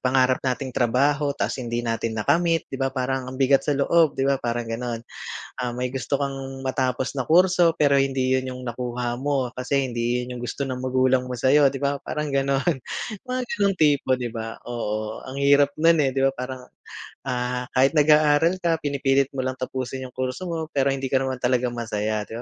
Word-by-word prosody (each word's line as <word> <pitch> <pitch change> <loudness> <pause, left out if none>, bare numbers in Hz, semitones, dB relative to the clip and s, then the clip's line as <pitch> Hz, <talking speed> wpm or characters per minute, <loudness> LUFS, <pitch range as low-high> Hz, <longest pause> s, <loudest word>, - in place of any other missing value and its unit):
pangarap 130 0 +3
nating 130 0 -2
trabaho 140 +4 +1
tapos - - -2
hindi 120 -1 -3
natin 115 -1 -2
nakamit, 165 +9 +2
'di 135 - -5
ba 135 - +2
parang 130 0 -1
ang 130 - -7
bigat 135 0 +4
sa 145 - +2
loob, 160 +2 +3
'di - - 0
ba 140 0 +2
parang 120 0 -2
gano'n. 115 0 -3 0.6
Ah, 125 -1 -2
may 125 0 -2
gusto 135 +2 -2
kang 135 -1 -4
matapos 130 0 -1
na 130 - -1
kurso, 175 0 +5
pero 145 -3 +3
hindi 130 -1 +1
'yon 130 0 -3
yung 125 - -8
nakuha 120 0 -3
mo 135 -2 0
kasi 135 +2 0
hindi 120 +1 0
'yon 125 0 -6
yung - - -8
gusto 120 - -5
ng 130 -2 -3
magulang 130 0 +2
mo 125 - -4
sa'yo, 140 +3 +4
'di 135 - -5
ba 140 0 +1
parang 150 -1 -3
gano'n, 140 +4 +1 0.5
mga 255 0 -1 0.2
gano'ng 200 -1 +2
tipo, 145 -5 +3
'di 125 -1 -4
ba? 115 -1 -5
Oo, 110 -2 -3
ang 130 - -7
hirap 140 0 +4
no'n, 165 +1 +4
eh, 135 - +1
'di 135 - +1
ba 135 - +4
parang, 125 0 -5 0.6
ah, 125 -1 -2
kahit 135 +4 +3
nag-aaral 150 +4 +4
ka, 165 -1 +2
pinipilit 140 -1 +1
mo 135 - -2
lang 130 0 -2
tapusin 130 0 -4
yung 125 - -11
kurso 130 +7 -3
mo 160 -2 -3
pero 140 -3 +1
hindi 135 0 -3
ka 135 - +3
naman 130 -1 -3
talaga 125 0 +1
masaya, 110 -2 -2
'di 115 - -7
130 Hz, 200 wpm, -24 LUFS, 125-140 Hz, 0.6 s, kurso